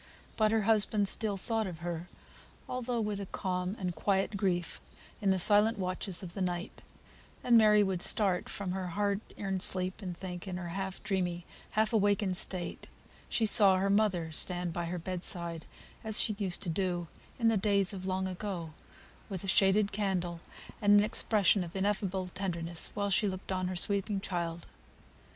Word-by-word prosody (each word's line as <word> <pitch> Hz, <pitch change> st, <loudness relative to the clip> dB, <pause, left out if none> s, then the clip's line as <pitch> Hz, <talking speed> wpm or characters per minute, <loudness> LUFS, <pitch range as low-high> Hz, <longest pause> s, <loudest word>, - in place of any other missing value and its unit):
But 215 Hz, -1 st, +2 dB
her 220 Hz, -1 st, +2 dB
husband 210 Hz, -1 st, +3 dB
still 205 Hz, 0 st, +1 dB
thought 225 Hz, +1 st, -1 dB
of 170 Hz, -3 st, -8 dB
her, 175 Hz, 0 st, -4 dB, 0.6 s
although 250 Hz, -1 st, -2 dB
with 210 Hz, -2 st, -2 dB
a 200 Hz, -, -6 dB
calm 180 Hz, 0 st, -3 dB
and 180 Hz, -2 st, -3 dB
quiet 195 Hz, +4 st, 0 dB
grief, 180 Hz, -4 st, -1 dB, 0.4 s
in 200 Hz, -, +1 dB
the 190 Hz, -, +3 dB
silent 210 Hz, +4 st, +5 dB
watches 185 Hz, 0 st, -1 dB
of 175 Hz, -2 st, -7 dB
the 195 Hz, -, -4 dB
night: 175 Hz, -1 st, -3 dB, 0.6 s
and 240 Hz, -, +4 dB
Mary 210 Hz, -2 st, +6 dB
would 190 Hz, -3 st, -2 dB
start 190 Hz, -3 st, +1 dB
from 195 Hz, -3 st, -4 dB
her 185 Hz, 0 st, -3 dB
hard 200 Hz, +3 st, -1 dB, 0.2 s
earned 195 Hz, -2 st, -3 dB
sleep, 185 Hz, +2 st, +1 dB
and 180 Hz, -3 st, -6 dB
think 180 Hz, 0 st, -7 dB
in 180 Hz, -1 st, -4 dB
her 175 Hz, -1 st, -6 dB
half 190 Hz, +1 st, -5 dB
dreamy, 175 Hz, -3 st, -2 dB, 0.3 s
half 220 Hz, +1 st, +2 dB
awakened 205 Hz, -3 st, +2 dB
state, 180 Hz, -1 st, -3 dB, 0.4 s
she 225 Hz, -, +1 dB
saw 200 Hz, -3 st, +6 dB
her 195 Hz, +1 st, +1 dB
mother 195 Hz, -6 st, +1 dB
stand 175 Hz, +1 st, -1 dB
by 170 Hz, 0 st, -3 dB
her 175 Hz, +2 st, -4 dB
bed 180 Hz, +1 st, -5 dB
side, 170 Hz, -2 st, -2 dB, 0.4 s
as 220 Hz, -1 st, +5 dB
she 215 Hz, -, +3 dB
used 190 Hz, -4 st, +1 dB
to -, -, -1 dB
do 175 Hz, 0 st, -1 dB, 0.3 s
"in 230 Hz, -2 st, +3 dB
the 225 Hz, -, +2 dB
days 200 Hz, -1 st, +3 dB
of 190 Hz, -1 st, -6 dB
long 190 Hz, 0 st, -1 dB
ago;" 180 Hz, -4 st, -5 dB, 0.6 s
with 190 Hz, -3 st, -4 dB
a -, -, -5 dB
shaded 195 Hz, +2 st, +3 dB
candle 185 Hz, -4 st, -2 dB, 0.4 s
and 205 Hz, 0 st, +6 dB
an 205 Hz, -, +3 dB
expression 210 Hz, -3 st, +3 dB
of 170 Hz, +2 st, -10 dB
ineffable 195 Hz, -1 st, -1 dB
tenderness, 170 Hz, -3 st, -1 dB
while 200 Hz, 0 st, -1 dB
she 205 Hz, +3 st, +3 dB
looked 185 Hz, 0 st, -7 dB
on 185 Hz, -1 st, -1 dB
her 185 Hz, -, -4 dB
sleeping 200 Hz, +2 st, 0 dB
child. 170 Hz, -3 st, -4 dB
190 Hz, 180 wpm, -31 LUFS, 180-205 Hz, 0.6 s, Mary